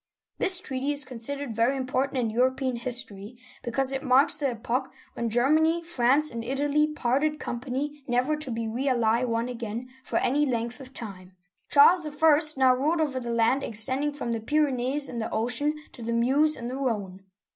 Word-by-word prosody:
This 370 -1 +4
treaty 270 -3 -3
is 290 -1 +1
considered 255 +1 -4
very 235 +5 +1
important 260 +1 -2
in 235 -3 0
European 255 +1 0
history, 235 -2 -3 0.2
because 265 +2 0
it 265 - -2
marks 270 +4 +3
the 285 - 0
epoch 245 +2 -3 0.2
when 235 -1 -3
Germany, 310 +8 +2
France, 295 -1 +2
and 230 -1 -5
Italy 285 +4 +1
parted 300 +3 0
company, 275 +4 -5
never 250 +5 +1
to 300 -3 -7
be 230 -1 -3
really 235 -1 0
one 230 0 -1
again 240 0 -6
for - - -2
any 285 +4 +1
length 240 -2 -2
of 260 -1 -11
time. 190 -5 -9 0.4
Charles 315 +3 +5
I. 300 0 +3 0.2
now 260 -1 +5
ruled 300 +6 0
over 285 -5 -1
the 240 -1 -6
land 235 +3 +2
extending 260 +7 +1
from 285 -5 -5
the 230 - -2
Pyrenees 280 +1 +1
and 235 -2 -5
the 220 - -3
Ocean, 245 +7 0 0.2
to - - -13
the 230 +1 -3
Meuse 275 +7 +3
and 235 - -6
the 255 +2 -5
Rhone. 205 -8 -3
255 Hz, 180 wpm, -26 LUFS, 235-290 Hz, 0.4 s, Charles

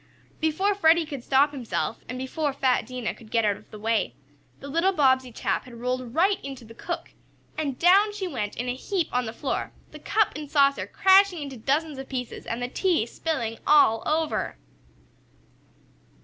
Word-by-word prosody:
Before 335 +6 +1
Freddie 335 -4 +4
could 280 -5 -7
stop 280 +3 +3
himself, 245 -4 -3
and 255 - -4
before 280 +3 -2
fat 260 -4 +1
Dinah 250 -3 -3
could 225 - -16
get 230 -1 +2
out 205 -1 +2
of - - -17
the 215 - -10
way, 220 +1 0 0.4
the 280 - -9
little 335 +7 +2
Bobbsey 260 -5 +3
chap - - -2
had 250 -2 -12
rolled 250 0 -3
right 385 +4 +2
into 270 -3 -8
the 225 - -13
cook, 340 +8 -5 0.4
and 285 -5 -2
down 390 +5 +5
she 410 -2 -4
went 215 -11 -4
in 245 - -3
a 245 - 0
heap 345 +6 -2
on 250 -1 0
the - - -3
floor, 265 +4 -3 0.2
the - - -10
cup 435 -2 +1
and 300 -1 -6
saucer 280 -2 +3
crashing 380 -4 +4
into 275 -2 -7
dozens 285 +4 -1
of 270 - -8
pieces, 250 -3 -5
and 235 +2 -3
the - - -1
tea 335 - +1
spilling 235 -5 -3
all 255 -7 +5
over. 315 0 -1
275 Hz, 185 wpm, -26 LUFS, 245-325 Hz, 0.4 s, down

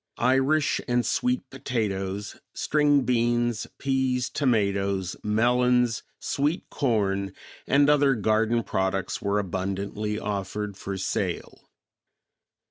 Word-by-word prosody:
Irish 135 +4 +2
and 120 -1 +1
sweet 250 0 0
potatoes, 100 -4 -3 0.2
string 145 -2 +3
beans, 120 -2 +1
peas, 130 -2 0
tomatoes, 100 - 0
melons, 120 +2 +2 0.2
sweet 150 +5 -1
corn, 100 -7 0 0.3
and 140 +1 +4
other 145 -2 +4
garden 110 +2 +1
products 95 -1 -1
were 100 0 0
abundantly 100 +2 -2
offered 105 0 -3
for 95 0 -5
sale. 95 - -3
115 Hz, 95 wpm, -26 LUFS, 100-130 Hz, 0.3 s, and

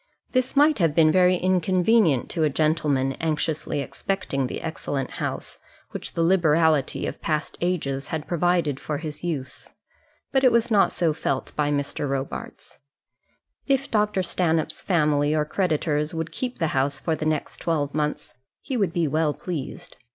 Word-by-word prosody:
This 255 +1 0
might 295 -1 +5
have 165 -4 +2
been 155 -2 +5
very 185 +1 +5
inconvenient 185 - +2
to 170 - -2
a 155 - +3
gentleman 145 -2 +1
anxiously 155 -2 -1
expecting 140 -4 -2
the - - -5
excellent 145 -4 -3
house - - -4 0.3
which - - -6
the 165 - +1
liberality 160 -5 +3
of - - -5
past 155 -2 -2
ages 145 -6 -1
had 155 -2 -4
provided 170 -5 +1
for 150 - -3
his 155 +1 -7
use; 150 -7 -4 0.6
but 265 -1 +2
it 255 - +6
was 235 0 +2
not 205 -2 +4
so 165 -3 +1
felt 140 -3 -3
by 150 -1 +1
Mr. 145 0 -2
Robarts. 135 0 -5 0.9
If 275 -1 +1
Dr. 210 -3 +1
Stanhope's 165 -3 0
family 150 -4 +2
or 150 -1 +1
creditors 155 -2 0
would 165 0 -3
keep 250 -1 -4
the 165 - 0
house 135 +1 0
for 160 - -1
the 155 - -3
next 155 -2 -2
twelve 150 -4 -1
months, 150 -4 -2 0.3
he 270 - -4
would 195 -8 +1
be 170 -3 +1
well 155 0 +1
pleased. 165 -7 -6
160 Hz, 160 wpm, -24 LUFS, 150-180 Hz, 0.9 s, it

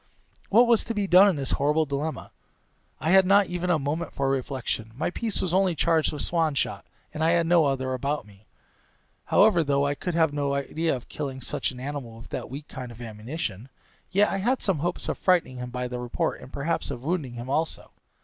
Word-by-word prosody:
What 235 +5 +6
was 235 -2 +4
to 230 - -3
be 205 -1 0
done 185 +2 +7
in 195 - +2
this 135 -3 -2
horrible 150 +3 +2
dilemma? 145 +2 -4 0.7
I 160 - 0
had 190 0 +7
not 200 +2 +5
even 180 0 -3
a 175 - +4
moment 155 +4 -3
for 135 -1 0
reflection; 130 -4 -3
my 150 - -1
piece 220 +2 -2
was 180 - -1
only 190 -2 +3
charged 160 -1 +2
with 150 - -4
swan 165 -4 +1
shot, - - -2 0.3
and 155 - -2
I 165 +1 +4
had 170 -1 +3
no 170 -1 +4
other 130 -1 -1
about 140 +1 -2
me. 100 0 -19 0.8
However, 200 -6 +5
though 140 -1 +1
I 140 - +1
could 175 +4 -4
have 160 -3 +3
no 140 -1 0
idea 155 +3 -1
of 125 - -9
killing 135 -3 -5
such 125 - -2
an 125 - -9
animal 130 -4 -6
with 115 - -12
that - - -5
weak 140 +4 -8
kind 125 -2 -7
of 115 - -12
ammunition, 115 - -5 0.4
yet 200 +2 +3
I - - -1
had 245 +7 0
some 190 -7 +1
hopes 175 +4 -2
of - - -3
frightening 175 -8 +2
him 125 0 -5
by 125 0 -3
the 125 0 -5
report, 120 -1 -2
and 130 - -12
perhaps 150 +4 -2
of 120 - -6
wounding 155 -5 -2
him 120 +1 -7
also. 155 +4 -2
150 Hz, 220 wpm, -26 LUFS, 130-175 Hz, 0.8 s, done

